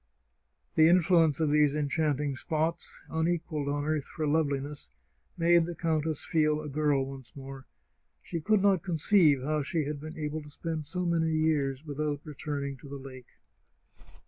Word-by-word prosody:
" 65 +3 -48
The 160 0 +7
influence 170 -4 +4
of 155 -2 +2
these 150 -1 +4
enchanting 150 -1 0
spots, 160 +4 -2
unequalled 160 -2 -1
on 145 0 -1
earth 155 -2 -1
for 155 - -4
loveliness, 145 - -1 0.5
made 170 0 +4
the 175 - -5
countess 160 -2 -1
feel 155 -2 +2
a 155 - -6
girl 145 -2 +1
once 135 -5 -10
more. 135 -1 -9 0.6
She 165 - -4
could 205 +3 +2
not 195 -4 +4
conceive 165 -5 +3
how 150 +2 0
she 155 +3 -1
had 145 0 -4
been 155 +1 -8
able 155 0 -3
to 150 - -12
spend 155 0 -5
so 180 +3 -2
many 165 -1 +1
years 155 -3 0
without 150 0 -2
returning 140 -2 -4
to 135 +2 -13
the 140 - -6
lake. 130 -2 -11
150 Hz, 165 wpm, -29 LUFS, 140-160 Hz, 0.6 s, The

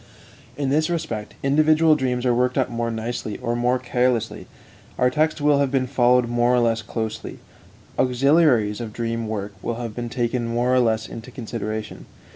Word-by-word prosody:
In 140 -2 -1
this 155 +3 +2
respect, 155 -12 -4
individual 155 +3 +4
dreams 125 -3 -1
are 125 - +3
worked 125 +2 +1
up 130 -2 +1
more 115 0 -2
nicely 110 -1 -4
or 120 0 -2
more 125 +1 +1
carelessly, 125 -2 -1 0.5
our 125 0 +3
text 155 +2 0
will 145 -1 +4
have 140 -1 +2
been 130 -1 +1
followed 125 -1 +3
more 120 +1 +2
or - - +3
less 115 -1 +1
closely, 110 0 -5 0.6
auxiliaries 125 -4 +3
of 110 -2 -6
the - - -20
dream 115 -1 -2
work 105 -2 -4
will 120 - -3
have 115 -2 -5
been 120 -1 -4
taken 120 0 -1
more 120 +2 +1
or 130 - +4
less 110 -2 +1
into 115 +2 -9
consideration. 110 -3 -6
120 Hz, 180 wpm, -23 LUFS, 115-130 Hz, 0.6 s, individual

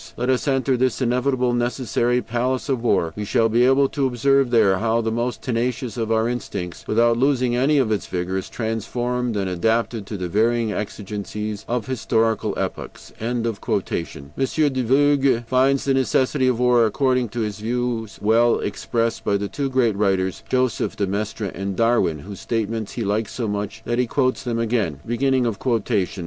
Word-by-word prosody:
Let 125 +2 +1
us 130 +3 0
enter 135 -1 +2
this 130 +1 +1
inevitable, 125 0 +1
necessary 120 0 0
palace 125 +4 -2
of 130 -4 0
war; 85 -8 +1
we 105 - -4
shall 115 +2 +2
be 120 +3 +3
able 135 +2 +4
to 140 -2 0
observe 135 +2 +2
there 100 -6 +4
how 115 +1 +1
the 110 0 -1
most 120 +2 -2
tenacious 120 0 -2
of 115 -2 -2
our 110 0 +2
instincts, 95 -7 -5
without 115 +1 +3
losing 130 -2 +2
any 135 +4 +3
of 125 -5 +2
its 105 - -1
vigor, 90 +1 -3
is 95 - -8
transformed 120 +1 -2
and 100 -1 -1
adapted 110 +3 0
to 105 - -5
the 90 -1 -3
varying 115 +4 +1
exigencies 105 0 -5
of 120 -2 -1
historical 115 -3 0
epochs." - - -5
M. 120 +1 -2
de 115 - +1
Vogüé 135 - 0
finds 130 +3 +2
the 135 - +2
necessity 130 +1 +2
for 130 - +4
war, 120 -1 +4
according 125 +1 +1
to 120 +3 -4
his 105 -2 -3
views, 115 -1 -2
well 115 +2 +4
expressed 115 +3 -2
by 100 - +1
the 100 0 -3
two 135 +8 -3
great 125 -5 +2
writers, 95 -2 0
Joseph 130 -4 0
de 100 - 0
Maistre 105 +1 -3
and 95 +1 -4
Darwin, 115 -7 +2
whose 100 +2 -9
statements 110 -2 -2
he 120 - -3
likes 105 +1 -1
so 120 -3 -2
much 105 +2 -4
that 120 +1 -1
he 125 - +2
quotes 130 +1 0
them 120 -2 -2
again. 110 - 0
115 Hz, 170 wpm, -22 LUFS, 105-125 Hz, -, able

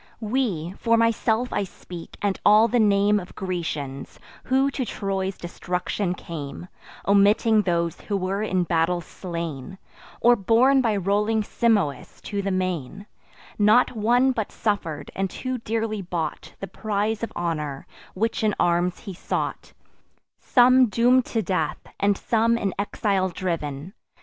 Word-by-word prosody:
We—for 220 -2 0
myself 230 +1 +1
I - - 0
speak, 175 -2 -10
and 200 -2 0
all 215 +2 +6
the 240 +2 +1
name 205 -1 +4
Of 180 - -11
Grecians, 155 -8 -4 0.3
who 270 +2 +2
to 270 - -2
Troy's 195 -4 -3
destruction 180 +2 -3
came, 165 0 -7 0.4
(Omitting 205 +2 +4
those 170 -3 -1
who 205 - -2
were 195 +2 -2
in 185 -4 0
battle 170 +1 +1
slain, 170 -2 -6 0.4
Or 240 +1 +5
borne 240 +6 +4
by 225 -4 +1
rolling 210 +3 +1
Simois 205 -10 0
to 205 -1 -3
the 200 - -2
main) 185 -1 -3 0.5
Not 210 +4 +5
one 245 +4 +3
but 220 -5 -3
suffer'd, 165 -9 -2
and 195 0 -1
too 255 +6 -4
dearly 220 -2 -2
bought 170 -4 -4
The 195 - -5
prize 210 +2 -2
of 230 - -3
honour 150 -5 -3 0.3
which 225 +3 -1
in 210 -2 +2
arms 175 +1 +1
he 200 -4 -7
sought; 175 - -4 0.7
Some 255 0 +5
doom'd 245 +4 +3
to 225 -2 -2
death, 165 -4 -1 0.2
and 200 0 +2
some 230 0 +2
in 195 -4 -1
exile 200 -2 0
driv'n. 165 -2 -4
200 Hz, 140 wpm, -24 LUFS, 175-225 Hz, 0.7 s, all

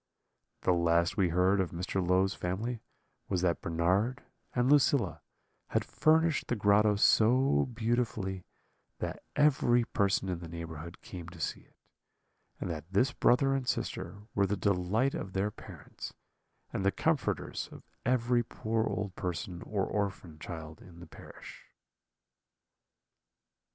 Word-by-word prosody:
"The 90 - +3
last 85 0 +2
we 95 -4 +2
heard 90 +3 +3
of 90 - -1
Mr. 90 +2 -2
Low's 95 +2 +2
family 110 +7 -3 0.5
was 90 -1 0
that 85 -2 +1
Bernard 95 +11 +1 0.3
and 125 0 +2
Lucilla 140 -2 +3 0.5
had - - 0
furnished 160 0 +2
the 125 - 0
grotto 105 0 +4
so 110 - +4
beautifully 110 -5 -1 0.5
that - - -4
every 130 -5 +4
person 100 -4 +1
in 90 -2 -2
the 85 - -8
neighbourhood 85 0 -8
came 85 -2 -8
to 85 -1 -13
see - - -2
it; - - -27 0.8
and - - -3
that 80 +2 -7
this 125 +8 +2
brother 135 +3 +3
and 135 -2 -2
sister 105 -5 -3
were 100 -1 +2
the 100 +1 -1
delight 100 +7 +1
of 95 - -5
their 100 +2 0
parents, - - -10 0.6
and - - -1
the 100 - +3
comforters - - -1
of - - -11 0.2
every 120 -1 +2
poor 110 -1 -1
old 100 -3 -3
person 85 0 -4
or 100 -3 -1
orphan 95 -6 -3
child 80 -2 -8
in 85 -2 -14
the 90 - -10
parish." - - -12
100 Hz, 140 wpm, -31 LUFS, 90-120 Hz, 0.8 s, grotto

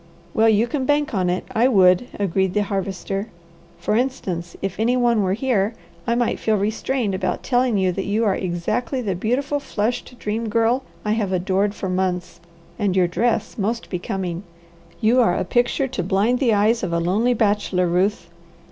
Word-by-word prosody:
"Well, 225 +1 +4
you 220 +1 +4
can 260 +1 -3
bank 295 -1 +1
on 185 -3 +1
it, 180 +1 -1
I 240 +2 +4
would," 190 -1 +4
agreed 190 -1 0
the 210 - +3
Harvester. 195 0 -3 0.5
"For 210 - -1
instance, 190 -9 -2
if 195 0 -4
any 240 +3 +2
one 240 -3 +3
were 190 -1 +1
here, 225 -3 0 0.3
I 235 - +2
might 240 -1 0
feel 220 - +1
restrained 215 +2 -1
about 185 - -2
telling 245 -3 +2
you 190 -1 +2
that 195 +2 -4
you 215 +3 +1
are 200 - +3
exactly 190 +9 -2
the 200 -4 -1
beautiful, 265 - -1
flushed 245 0 -3
Dream 225 0 -3
Girl 230 +4 +2 0.2
I 210 - +1
have 215 -3 0
adored 190 +3 0
for 190 - -4
months, 185 -1 -2 0.4
and 200 -3 +1
your 185 -1 +4
dress 220 +4 -1
most 225 +4 -2
becoming. 180 -1 -3 0.6
You 235 +3 +4
are 200 -7 +3
a - - -1
picture 240 +6 +1
to 255 - -3
blind 200 +7 +1
the 250 -4 +3
eyes 220 +3 +2
of 185 - -2
a 170 - +2
lonely 210 +9 +1
bachelor, 205 -4 +1
Ruth." 180 +1 0
210 Hz, 185 wpm, -22 LUFS, 190-240 Hz, 0.6 s, Well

